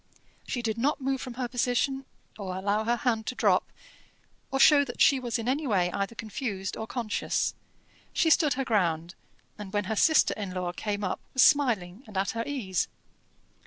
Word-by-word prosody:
She 245 Hz, -, -3 dB
did 225 Hz, 0 st, -2 dB
not 285 Hz, +6 st, +1 dB
move 270 Hz, -1 st, -1 dB
from 250 Hz, -2 st, -7 dB
her 250 Hz, -1 st, -2 dB
position, 260 Hz, +2 st, 0 dB, 0.3 s
or 190 Hz, -2 st, -4 dB
allow 205 Hz, +3 st, 0 dB
her 240 Hz, +1 st, +2 dB
hand 230 Hz, -2 st, -1 dB
to 255 Hz, -, -3 dB
drop, -, -, +2 dB, 0.8 s
or 270 Hz, -, -1 dB
show 285 Hz, +1 st, +7 dB
that 245 Hz, -4 st, -8 dB
she 275 Hz, -, +5 dB
was 245 Hz, -1 st, -2 dB
in 230 Hz, 0 st, -5 dB
any 280 Hz, +3 st, 0 dB
way 180 Hz, -6 st, +2 dB
either 200 Hz, +4 st, -3 dB
confused 215 Hz, -3 st, -4 dB
or 220 Hz, -, -5 dB
conscious. 230 Hz, -4 st, -1 dB, 0.6 s
She 325 Hz, -2 st, +2 dB
stood 305 Hz, -4 st, +4 dB
her 270 Hz, 0 st, -2 dB
ground, 175 Hz, -7 st, 0 dB, 0.5 s
and 205 Hz, -2 st, -7 dB
when 205 Hz, 0 st, +1 dB
her 220 Hz, +3 st, -2 dB
sister 315 Hz, +9 st, +4 dB
in 195 Hz, -3 st, -5 dB
law 180 Hz, -1 st, -2 dB
came 205 Hz, +3 st, -3 dB
up 185 Hz, -, -2 dB, 0.2 s
was 260 Hz, -, +6 dB
smiling 235 Hz, -8 st, +2 dB
and 210 Hz, -3 st, -7 dB
at 195 Hz, +1 st, +1 dB
her 230 Hz, 0 st, -2 dB
ease. 220 Hz, -11 st, -1 dB
230 Hz, 190 wpm, -28 LUFS, 200-260 Hz, 0.8 s, show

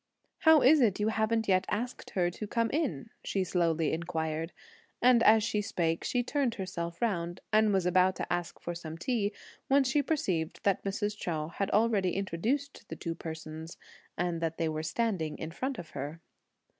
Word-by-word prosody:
"How 320 Hz, -3 st, +6 dB
is 295 Hz, +3 st, +7 dB
it 210 Hz, -6 st, +3 dB
you 210 Hz, +1 st, +2 dB
haven't 220 Hz, 0 st, +1 dB
yet 185 Hz, -1 st, +3 dB
asked 245 Hz, +4 st, -3 dB
her 175 Hz, -2 st, +2 dB
to 210 Hz, +4 st, -6 dB
come 230 Hz, +2 st, 0 dB
in?" 240 Hz, -, -1 dB
she 195 Hz, -, 0 dB
slowly 165 Hz, -3 st, +1 dB
inquired; 160 Hz, -1 st, -2 dB, 0.5 s
and 245 Hz, -1 st, +5 dB
as 220 Hz, -1 st, +6 dB
she 210 Hz, -2 st, 0 dB
spake, 170 Hz, -6 st, -1 dB
she 245 Hz, -1 st, 0 dB
turned 260 Hz, -2 st, 0 dB
herself 170 Hz, -4 st, -4 dB
round 175 Hz, -5 st, -1 dB
and 215 Hz, 0 st, +5 dB
was 190 Hz, -3 st, +2 dB
about 185 Hz, +1 st, +4 dB
to -, -, -2 dB
ask 175 Hz, -1 st, -3 dB
for 175 Hz, -, -4 dB
some 165 Hz, -2 st, -7 dB
tea, 215 Hz, 0 st, 0 dB, 0.4 s
when 275 Hz, 0 st, +5 dB
she 265 Hz, +3 st, +2 dB
perceived 190 Hz, -, -1 dB
that 200 Hz, -2 st, +2 dB
Mrs. 205 Hz, +1 st, -2 dB
Chou 160 Hz, -6 st, -3 dB
had 195 Hz, +4 st, -2 dB
already 210 Hz, -5 st, +2 dB
introduced 225 Hz, -, -2 dB
the -, -, -5 dB
two 165 Hz, -, -4 dB
persons 160 Hz, 0 st, -7 dB, 0.4 s
and 175 Hz, -1 st, -1 dB
that 165 Hz, -1 st, -1 dB
they 165 Hz, -, 0 dB
were 155 Hz, 0 st, -2 dB
standing 160 Hz, -2 st, -1 dB
in 160 Hz, -, -5 dB
front 260 Hz, +9 st, -3 dB
of 170 Hz, -, -8 dB
her. 145 Hz, +4 st, -5 dB
190 Hz, 180 wpm, -30 LUFS, 165-230 Hz, 0.5 s, is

